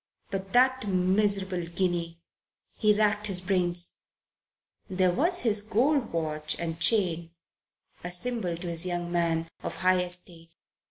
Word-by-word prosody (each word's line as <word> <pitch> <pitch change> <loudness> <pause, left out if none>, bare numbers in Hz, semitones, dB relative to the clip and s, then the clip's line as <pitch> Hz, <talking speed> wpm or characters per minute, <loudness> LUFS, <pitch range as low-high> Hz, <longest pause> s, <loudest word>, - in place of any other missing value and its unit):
But 195 0 -4
that 255 -1 +3
miserable 190 0 +1
guinea! 170 -1 -2 0.5
He 215 -2 +2
racked 210 0 +2
his 190 -3 -1
brains. 180 -2 -1 0.9
There 185 -1 +2
was 340 - +1
his 215 -3 +1
gold 245 +5 +1
watch 155 -2 -3
and 165 -1 -4
chain, 170 -3 +1 0.7
a 175 - -4
symbol, 180 -2 -1
to 175 +1 -6
his 165 -1 0
young 175 -1 -3
mind, 165 -1 0
of - - -4
high 185 0 +2
estate. 175 -2 0
180 Hz, 130 wpm, -27 LUFS, 170-205 Hz, 0.9 s, that